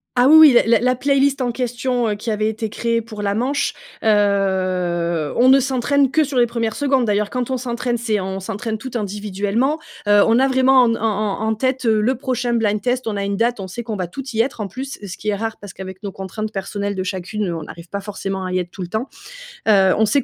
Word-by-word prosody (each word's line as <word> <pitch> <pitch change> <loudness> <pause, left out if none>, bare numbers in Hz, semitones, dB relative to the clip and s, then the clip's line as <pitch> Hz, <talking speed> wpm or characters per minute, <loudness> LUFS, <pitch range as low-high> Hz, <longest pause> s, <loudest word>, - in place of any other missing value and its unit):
Ah, 250 +1 +5
oui, 310 - +8
oui, 310 -5 +9
l 230 - +4
la 230 -2 +5
la 250 +2 +2
playlist 275 +1 +2
en 245 -1 0
question, 245 0 -1
heu, - - 0
qui 210 +3 -5
avait 215 0 0
été 220 0 -3
créée 230 +2 -1
pour 220 -2 -8
la 200 0 0
manche, 260 +6 0 0.3
heu, 185 -6 +1
on 250 +2 +5
ne 270 +1 +7
s'entraîne 270 +1 +1
que 315 +1 +3
sur 280 -2 -3
les 240 - +5
1res 230 -2 -2
secondes. 270 -3 +1
D'ailleurs, 210 -1 0
quand 250 -1 -2
on 260 - 0
s'entraîne, 240 -1 -2
c'est 225 -3 -1
on 190 0 -4
s'entraîne 220 +3 -4
toutes 250 +3 -8
individuellement. 210 +6 -1 0.3
Heu, 205 0 +6
on 225 +1 +4
a 265 +2 +4
vraiment 260 0 +5
en 240 - +3
n 230 - 0
en - - -11 0.4
en 220 - -1
en 220 - +1
tête, 260 +2 -1
heu, 220 -1 +3
le 230 +5 +2
prochain 250 -1 -2
blind 210 -3 +1
test. 245 +3 -1
On 210 -2 -2
a 200 - -2
une 200 0 -2
date, 235 +1 +1
on 190 - -5
sait 185 +6 -6
qu'on 225 -2 -5
va 185 -2 -2
toutes 255 +8 -7
y 225 - +4
être, 235 -2 -3
en 205 - -2
plus, 265 +6 -7
ce 195 -1 -7
qui 215 - -3
est 205 - +1
rare 225 +2 -4
parce 205 -2 -10
qu'avec 190 +1 -9
nos 200 - -4
contraintes 205 +3 -5
personnelles 200 +1 -3
de 190 - -3
chacune, 190 +1 -3
on 165 -2 -4
arrive 170 +2 -11
pas 200 - -3
forcément 195 -2 -4
à 185 - -4
y 185 - +1
être 175 -1 -4
tout 185 - -7
le 175 - -7
temps. 220 +7 -3 0.6
Heu, 195 -3 +5
on 220 - +4
sait 275 +5 +2
220 Hz, 260 wpm, -20 LUFS, 200-250 Hz, 0.6 s, oui